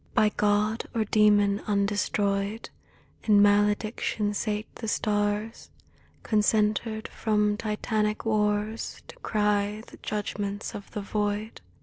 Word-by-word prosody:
By 215 - +5
god 210 +2 +1
or 220 -1 +1
demon 205 -1 +4
undestroyed, 200 +1 0 0.5
In 210 -2 +5
malediction 205 +1 +2
sate 210 +1 -2
the 225 - -5
stars, 210 +1 -1 0.5
Concentered 215 +1 +1
from 210 -1 +1
Titanic 210 0 -1
wars 210 0 -1
To - - -10
cry 210 0 0
the - - -14
judgments 205 -1 -4
of 205 - -8
the 210 - -5
Void. 210 +1 -2
210 Hz, 105 wpm, -27 LUFS, 205-215 Hz, 0.5 s, By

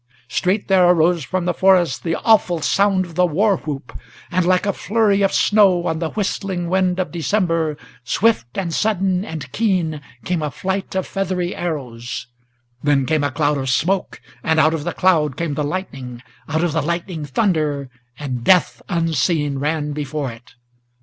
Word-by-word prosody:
Straight 190 +8 0
there 185 -2 +5
arose 170 -1 +3
from 185 +4 -2
the 175 - +1
forest 185 -6 +3
the 165 -1 -1
awful 195 -6 +3
sound 195 -2 +2
of 170 - -12
the 180 +2 +3
war 195 +5 +2
whoop, 150 -3 -7 0.4
And, 175 0 +1
like 185 +1 +3
a 200 - +1
flurry 205 -1 +1
of 195 - +3
snow 195 -5 +4
on 160 -2 -1
the 165 -1 -2
whistling 190 -3 -2
wind 185 -1 +1
of 185 - -2
December, 165 -2 0 0.3
Swift 125 - +1
and 175 -4 -2
sudden 190 -3 +1
and 155 -8 -7
keen 180 - 0 0.2
came 175 -3 -1
a 150 - -1
flight 190 +5 -3
of 190 - 0
feathery 185 -2 -2
arrows, 125 -8 -4 0.6
Then 140 -2 +2
came 155 +1 +1
a 145 - +1
cloud 145 0 0
of 135 -1 -2
smoke, 180 +8 0 0.2
and 160 0 +2
out 155 +1 +4
of 160 -2 -3
the 175 - -2
cloud 155 -7 +2
came 165 -3 -2
the 150 - -1
lightning, 135 -7 -5 0.3
Out 160 +2 0
of 175 - +1
the 160 - +1
lightning 170 +1 -3
thunder, 150 - 0 0.3
and 130 -5 -4
death 180 +5 +3
unseen 160 -4 0
ran 150 +1 -1
before 145 -2 -3
it. 115 +1 -15
170 Hz, 175 wpm, -20 LUFS, 150-185 Hz, 0.6 s, there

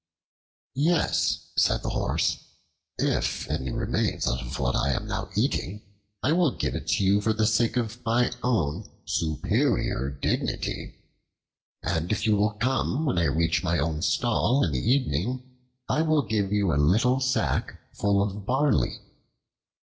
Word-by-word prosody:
"Yes," 155 +4 +1
said - - +2
the - - -2
Horse; - - 0 0.6
"if - - 0
any 65 - -2
remains - - -1
out - - 0
of 60 -2 -6
what - - 0
I 70 0 +1
am - - -3
now - - -4
eating 105 +3 -1 0.4
I 145 - +2
will 170 -1 +4
give - - -3
it - - -1
you 100 +1 +3
for 110 +1 +1
the 110 0 +1
sake 115 +3 +2
of 120 0 -3
my 120 +2 +2
own 105 -6 -1 0.2
superior 75 -4 0
dignity, 70 0 -2 0.9
and 80 +1 -1
if 110 0 0
you 110 -1 +4
will 105 +1 +2
come 130 +6 0
when 125 - +1
I 85 - +2
reach 80 +4 +1
my 85 -1 +1
own 80 0 -1
stall 120 +5 +2
in 85 - 0
the 65 - -1
evening, 125 - 0 0.4
I 155 - +1
will 155 -2 +2
give 105 -4 -1
you 100 -5 +2
a 75 - +2
little 115 - +3
sack 130 -1 -1
full 100 -1 +2
of 100 0 -4
barley." 130 - +1
105 Hz, 155 wpm, -26 LUFS, 85-125 Hz, 0.9 s, will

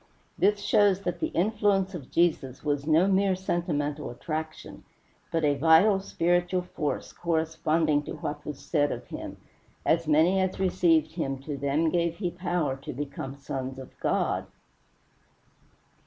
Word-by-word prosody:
This 205 +1 +2
shows 200 -2 +3
that 175 -3 -3
the - - 0
influence 200 0 +1
of 150 -8 -8
Jesus 155 -7 0
was 145 -1 -1
no 160 +4 +4
mere 195 -1 +3
sentimental 155 -5 -2
attraction, 155 +5 -6 0.5
but 165 -1 0
a 145 -1 +4
vital, 165 +8 +5
spiritual 175 0 0
force, 155 -4 -4
corresponding 160 -2 +1
to - - -5
what 150 0 -5
was 150 -2 -6
said 145 -3 +1
of - - -5
him: - - -7 0.5
"As 165 0 +2
many 160 +5 +4
as 190 0 -1
received 165 -4 +3
him 135 -5 -3
to 145 0 -4
them 140 +4 +1
gave 170 -1 +1
he 180 -3 -2
power 175 -6 -1
to 135 - -7
become 135 0 -5
sons 135 -1 -5
of 130 - -10
God." - - 0
165 Hz, 145 wpm, -27 LUFS, 145-180 Hz, 0.5 s, vital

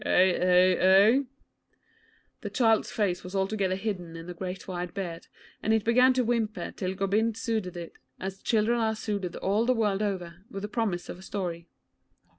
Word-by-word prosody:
Eh, 185 0 +4
eh, 180 0 +4
eh?' 200 +8 +6 1.2
The - - -4
child's 225 -4 +2
face 190 -5 -1
was 180 +2 -8
altogether 195 -1 0
hidden 190 -5 -4
in 165 0 -8
the 180 - -6
great 180 +1 -6
white 180 -1 -5
beard, 175 -4 -5 0.3
and 220 +1 +2
it 220 - +1
began 250 +3 +5
to 255 0 +1
whimper 225 -2 -1
till 185 -1 -4
Gobind 210 +3 +1
soothed 220 -6 -2
it 170 -1 -7 0.3
as 190 0 -6
children 230 +1 +2
are 220 -1 +1
soothed 200 -5 -3
all 205 +4 +1
the 255 - +3
world 210 -3 +1
over, 180 -4 -3
with 195 0 -6
the - - -2
promise 205 -6 -2
of 175 - -7
a - - -12
story. 175 -4 -4
195 Hz, 180 wpm, -28 LUFS, 180-220 Hz, 1.2 s, eh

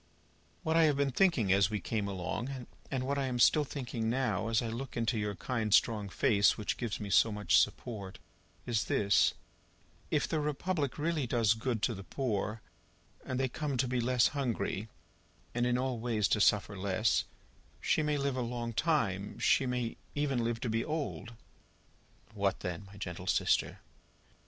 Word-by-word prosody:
"What 160 0 0
I 165 -1 +6
have 150 -3 +2
been 140 -1 +1
thinking 135 - +3
as 100 0 +4
we 105 -1 -2
came 105 -2 -2
along, 100 +8 -4 0.2
and 130 -2 -2
what 140 +1 -1
I 135 - 0
am 125 -1 -2
still 150 +5 +5
thinking 120 -5 -3
now, 125 -3 0
as 115 0 +2
I - - -2
look 120 +3 -5
into 115 +1 0
your 105 -1 -2
kind 110 +1 -2
strong 105 -1 +3
face 105 -1 +3
which 105 - -2
gives 120 -5 -3
me 100 -1 -5
so 115 - +5
much 105 0 +3
support, 100 -6 -2 0.5
is 115 -3 0
this: 100 -1 +3 0.7
If - - +1
the 160 - 0
Republic 150 -2 -1
really 155 -3 0
does 115 -3 +3
good 115 -1 -3
to 120 - +2
the 95 -2 -8
poor, 110 -3 -2 0.6
and 130 - -3
they 135 - +2
come 140 +1 -3
to 130 +1 +1
be 125 0 0
less 125 0 +3
hungry, 120 -6 -2 0.6
and 120 0 +1
in 125 0 +2
all 130 -2 -1
ways 110 -3 +1
to 105 - +2
suffer 105 0 +3
less, 100 +3 +1 0.5
she - - +1
may 150 -1 +1
live 140 -1 -1
a 130 - -1
long 120 -1 -3
time: 110 - 0
she 135 - +3
may 125 -2 -2 0.2
even 140 -5 0
live 115 0 -1
to - - -2
be 115 +1 0
old." 145 -7 -4 1.0
"What - - 0
then, 90 +2 -4
my 100 +1 -14
gentle 90 -2 -6
sister?" - - +1
120 Hz, 180 wpm, -32 LUFS, 105-135 Hz, 1.0 s, I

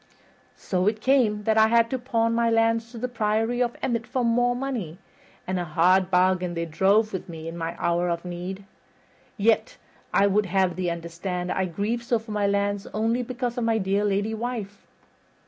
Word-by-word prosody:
So 185 0 -1
it 210 0 +1
came 220 -5 +2
that 220 +1 +3
I 220 - +6
had 230 0 +3
to 260 - -1
pawn 230 -2 0
my 235 0 +2
lands 225 0 +2
to 235 - -10
the 250 +3 -2
Priory 225 +1 0
of 240 -1 0
Emmet 235 -2 -1
for 250 0 -1
more 245 +1 +2
money, 245 - -4 0.5
and 185 0 -2
a - - -1
hard 180 +3 +3
bargain 180 -1 +2
they 170 0 -2
drove 200 +7 +2
with 190 - -5
me 160 -1 -7
in 165 - -6
my 165 0 -4
hour 175 +1 0
of 170 +1 -3
need. 180 +2 -6 0.7
Yet 225 - +1 0.3
I 200 - +4
would 200 +1 +2
have 185 -1 +1
thee 185 -1 -1
understand 170 +2 -4
I 190 - 0
grieve 205 +7 -2
so 235 0 +1
for 220 0 -9
my 205 -1 +1
lands 200 0 0
only 225 +3 +1
because 245 0 -3
of - - -1
my 225 -1 +2
dear 200 0 0
lady 205 +2 0
wife." 220 -3 -5
210 Hz, 195 wpm, -25 LUFS, 185-230 Hz, 0.7 s, I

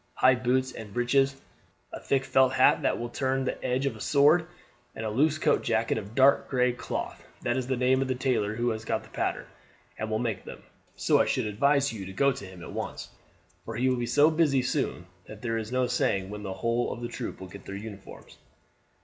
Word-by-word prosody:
High 130 - +5
boots 130 +1 0
and 110 -4 -9
breeches, 135 +3 +2 0.5
a - - -5
thick 135 -1 0
felt 130 0 +3
hat 130 - +4
that - - +1
will 120 0 -4
turn 135 0 -1
the - - -4
edge 130 +2 0
of 135 -5 -1
a 110 - -11
sword, 155 - +4 0.5
and 110 - -5
a 110 - -2
loose 150 +7 +2
coat - - +2
jacket - - 0
of 105 +4 -10
dark 135 +2 +4
gray 125 -1 +2
cloth. 125 - -5 0.2
That 120 - 0
is 130 -2 -2
the 130 -1 0
name 130 +1 +3
of 135 - 0
the 130 - -1
tailor 120 -5 0
who 120 +2 0
has 110 0 -4
got - - -2
the - - -16
pattern, - - -2 0.5
and 110 - -3
will 110 - 0
make 110 -4 -2
them. - - -10 0.3
So - - +3
I - - +1
should - - 0
advise 140 +6 +2
you 100 -4 -6
to 95 - -8
go 140 +8 +3
to 100 - -7
him 95 -2 -11
at - - -9
once, - - -5 0.5
for 115 - -6
he 125 +3 +2
will 130 - +1
be 120 -1 -2
so 145 +6 +5
busy 150 -5 +2
soon 125 - -2 0.2
that; 110 -1 -11
there 115 -1 -1
is 110 +1 -6
no 130 0 +2
saying 95 -5 0
when 105 0 -6
the 95 -2 -4
whole 115 +3 -1
troop 120 0 -6
will 95 - -8
get 95 +2 -12
their 100 - -6
uniforms." 100 -1 -10
125 Hz, 225 wpm, -28 LUFS, 110-135 Hz, 0.5 s, High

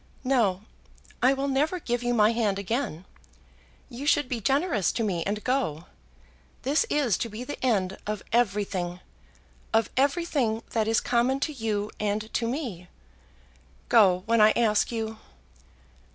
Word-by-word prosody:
"No; 225 -8 +1 0.6
I 255 +2 +5
will 275 +1 -2
never 295 +6 0
give 245 -6 -2
you 245 0 0
my 215 -1 +5
hand 220 -4 0
again. 200 - -3 0.8
You 270 +3 -7
should 290 -2 +3
be 240 -3 -3
generous 270 - +1
to 230 - -1
me 180 -6 -1
and 210 +1 -2
go. 250 - -1 0.8
This 290 - +2
is 265 -10 +1
to 230 - -2
be 220 +3 -6
the 290 +1 -7
end 195 -7 0
of 210 -1 -3
everything, 200 -6 0 0.7
of 225 -1 +2
everything 275 -5 +1
that 220 -2 0
is 225 0 +2
common 245 +3 +1
to 305 - -1
you 215 -4 -2
and 210 +1 -2
to 230 - 0
me. 235 - -4 1.0
Go, 190 -6 +5
when 230 0 +3
I 215 +1 +6
ask 220 -2 +2
you." 220 -1 -4
230 Hz, 150 wpm, -26 LUFS, 210-260 Hz, 1.0 s, I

